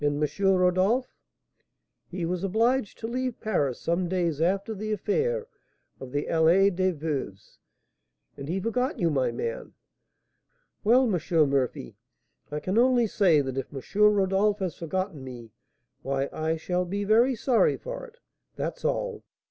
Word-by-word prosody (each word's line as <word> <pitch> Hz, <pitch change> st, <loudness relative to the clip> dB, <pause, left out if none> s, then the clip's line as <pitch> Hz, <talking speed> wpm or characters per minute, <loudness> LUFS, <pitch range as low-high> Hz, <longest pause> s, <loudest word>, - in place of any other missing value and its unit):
Rodolph?' 195 Hz, +5 st, +2 dB, 1.0 s
'He 180 Hz, -1 st, -3 dB
was 180 Hz, +2 st, -2 dB
obliged 225 Hz, +4 st, +1 dB
to 225 Hz, -, -5 dB
leave 255 Hz, 0 st, -3 dB
Paris 145 Hz, -, -1 dB
some 170 Hz, +1 st, -1 dB
days 170 Hz, -5 st, -1 dB
after 195 Hz, +5 st, 0 dB
the 215 Hz, +1 st, -4 dB
affair 465 Hz, -, 0 dB, 0.5 s
of 130 Hz, -1 st, -9 dB
the 145 Hz, +1 st, -1 dB
Allée 175 Hz, +4 st, +4 dB
des 185 Hz, +1 st, +2 dB
Veuves, 145 Hz, -, -5 dB, 0.8 s
and 140 Hz, +2 st, -8 dB
he 185 Hz, +3 st, -1 dB
forgot 250 Hz, +5 st, -1 dB
you, 170 Hz, -2 st, +1 dB
my 130 Hz, -4 st, +1 dB
man.' 115 Hz, -1 st, -5 dB, 1.1 s
'Well, 245 Hz, +5 st, +5 dB
M. 200 Hz, -9 st, 0 dB, 0.3 s
Murphy, 130 Hz, -, -2 dB, 0.5 s
I 150 Hz, -, -3 dB
can 185 Hz, +8 st, 0 dB
only 245 Hz, -1 st, +4 dB
say 180 Hz, -8 st, +3 dB
that 135 Hz, -1 st, -3 dB
if 135 Hz, -, -6 dB
M. 145 Hz, +9 st, -4 dB
Rodolph 200 Hz, +1 st, +2 dB
has 185 Hz, -6 st, -3 dB
forgotten 170 Hz, -2 st, -4 dB
me, 120 Hz, -3 st, -9 dB, 0.5 s
why 135 Hz, 0 st, -2 dB
I 160 Hz, +1 st, -1 dB
shall 180 Hz, +2 st, -1 dB
be 200 Hz, +3 st, -3 dB
very 230 Hz, +5 st, +4 dB
sorry 235 Hz, +1 st, +2 dB
for -, -, -7 dB
it, 475 Hz, 0 st, -20 dB, 0.4 s
that's -, -, -4 dB
all.' -, -, -2 dB
185 Hz, 145 wpm, -27 LUFS, 155-220 Hz, 1.1 s, Well